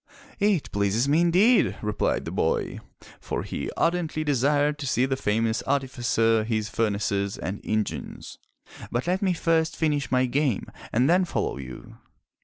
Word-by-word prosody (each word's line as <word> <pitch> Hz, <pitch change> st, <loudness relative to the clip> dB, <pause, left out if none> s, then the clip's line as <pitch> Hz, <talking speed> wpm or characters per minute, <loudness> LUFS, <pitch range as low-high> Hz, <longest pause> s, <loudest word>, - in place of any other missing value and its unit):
'' -, -, -24 dB, 0.2 s
"It 160 Hz, -, -6 dB
pleases 100 Hz, +5 st, +1 dB
me 150 Hz, +4 st, +3 dB
indeed," 190 Hz, +8 st, +4 dB
replied 105 Hz, -1 st, -1 dB
the -, -, -5 dB
boy, -, -, -1 dB, 0.4 s
for -, -, -4 dB
he -, -, -4 dB
ardently 165 Hz, -2 st, 0 dB
desired 145 Hz, +1 st, +1 dB
to 140 Hz, -, -4 dB
see 125 Hz, 0 st, +2 dB
the 135 Hz, 0 st, 0 dB
famous 110 Hz, -1 st, 0 dB
artificer, 120 Hz, -5 st, +1 dB
his 110 Hz, -1 st, -2 dB
furnaces 100 Hz, -2 st, -1 dB
and 100 Hz, +2 st, -5 dB
engines. 110 Hz, -1 st, -4 dB, 0.5 s
"But 120 Hz, +2 st, -2 dB
let 180 Hz, +2 st, 0 dB
me 190 Hz, -3 st, +2 dB
first 165 Hz, -1 st, +1 dB
finish 150 Hz, -4 st, 0 dB
my 130 Hz, 0 st, +3 dB
game 130 Hz, -3 st, 0 dB, 0.3 s
and 125 Hz, +4 st, +2 dB
then 180 Hz, +3 st, +4 dB
follow 175 Hz, -, -2 dB
you." 65 Hz, -2 st, -10 dB
130 Hz, 155 wpm, -25 LUFS, 110-155 Hz, 0.5 s, indeed